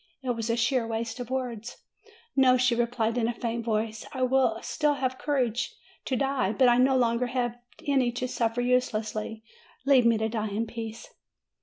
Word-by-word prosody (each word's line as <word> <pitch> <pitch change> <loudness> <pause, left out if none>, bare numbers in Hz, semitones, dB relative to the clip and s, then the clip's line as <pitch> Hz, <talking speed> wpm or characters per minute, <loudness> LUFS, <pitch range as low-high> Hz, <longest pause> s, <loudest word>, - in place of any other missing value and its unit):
It 255 - 0
was 230 -1 -3
a 230 - +1
sheer 235 0 +1
waste 225 +1 -3
of 245 -1 -5
words. 245 -3 -4 0.6
"No," 260 -2 +5
she 250 -1 +3
replied 235 0 0
in 225 - +1
a 240 - -1
faint 230 0 -3
voice, 220 -1 -1
"I 255 -2 +1 0.4
still 300 -1 +1
have 260 -2 -2
courage 250 -5 -1 0.3
to 260 - 0
die; 270 -5 0
but 260 +1 +4
I 240 0 +5
no 260 +1 +4
longer 240 0 +2
have 245 -1 -2 0.3
any 265 -4 +2
to 250 +1 -2
suffer 235 -1 -1
use 250 0 +2
lessly. 215 0 -4 0.4
Leave 265 -4 +5
me 230 -1 +4
to 220 0 0
die 220 -1 -2
in 210 +3 -1
peace." 230 0 -7
240 Hz, 185 wpm, -27 LUFS, 225-255 Hz, 0.6 s, No